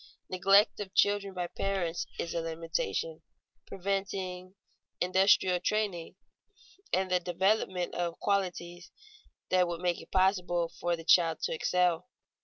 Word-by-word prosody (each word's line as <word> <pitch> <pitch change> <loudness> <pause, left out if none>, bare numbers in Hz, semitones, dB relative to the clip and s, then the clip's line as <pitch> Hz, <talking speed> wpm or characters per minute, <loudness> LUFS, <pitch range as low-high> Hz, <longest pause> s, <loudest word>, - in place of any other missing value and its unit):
Neglect 195 +3 +4
of 195 -2 -7
children 205 -1 +2
by 180 -1 -2
parents 175 -2 -2
is 170 - -3
a 170 - -1
limitation, 165 -3 -3 0.5
preventing 190 -1 -4 0.4
industrial 185 0 +3
training 200 -5 -2 0.8
and 185 0 0
the 180 - +3
development 185 0 0
of 170 -1 -3
qualities 175 -3 -2 0.6
that 185 -1 +4
would 170 -1 -4
make 175 -1 0
it 165 - -15
possible 180 -3 +1
for 175 0 0
the 165 -1 -11
child 165 -2 +4
to - - 0
excel. 180 +4 +1
180 Hz, 125 wpm, -30 LUFS, 170-195 Hz, 0.8 s, Neglect